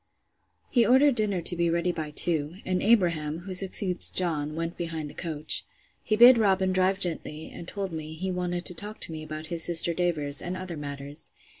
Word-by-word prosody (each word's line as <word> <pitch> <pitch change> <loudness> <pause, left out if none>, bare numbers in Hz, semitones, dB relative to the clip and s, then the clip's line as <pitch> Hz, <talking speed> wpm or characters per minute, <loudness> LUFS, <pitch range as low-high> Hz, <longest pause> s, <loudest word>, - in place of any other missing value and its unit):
He 240 - +4
ordered 265 +4 +4
dinner 210 -6 -1
to 170 +2 +5
be 170 0 0
ready 170 +1 0
by 155 -3 -5
two; 155 0 +2
and 185 -1 -1
Abraham, 170 -8 +1
who 185 +1 -7
succeeds 185 0 +1
John, 155 -4 0
went 165 +1 -4
behind 160 -3 -6
the - - -16
coach. 155 -2 -2 0.4
He 215 - -1
bid 240 +2 +7
Robin 190 -3 +2
drive 185 +1 +1
gently, 160 -4 0
and 170 - -10
told 195 -2 -5
me, 160 -1 -7
he 185 +3 -4
wanted 180 -1 -3
to - - +5
talk 205 +5 -6
to - - 0
me 160 -1 -7
about 155 0 -7
his 165 -1 +3
sister 170 0 +5
Davers, 155 -5 -1
and 180 +1 -5
other 185 -2 -7
matters. 145 +1 -5
175 Hz, 195 wpm, -26 LUFS, 155-185 Hz, 0.4 s, bid